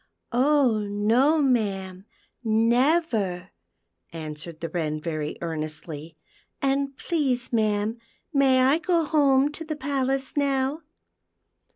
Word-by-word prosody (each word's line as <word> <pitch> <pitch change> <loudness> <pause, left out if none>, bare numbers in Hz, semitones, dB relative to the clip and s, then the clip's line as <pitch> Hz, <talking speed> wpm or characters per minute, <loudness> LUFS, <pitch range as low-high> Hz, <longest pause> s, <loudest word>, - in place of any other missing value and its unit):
" - - -53
Oh 260 -2 +3
no, 235 +10 +3
ma'am, 195 -7 -1 0.4
never," 230 - +1 0.6
answered 155 0 -7
the 165 - -4
Wren 155 -4 -2
very 155 -2 -4
earnestly. 155 -1 -6 0.2
" - - -40
And 275 0 0
please, 260 -8 -1
ma'am, 215 0 +1 0.3
may 270 -2 +4
I 275 +5 +4
go 340 -1 +1
home 285 -2 +3
to 325 - -6
the 310 -1 -4
palace 270 -1 -1
now 280 +1 0
245 Hz, 110 wpm, -25 LUFS, 180-280 Hz, 0.6 s, may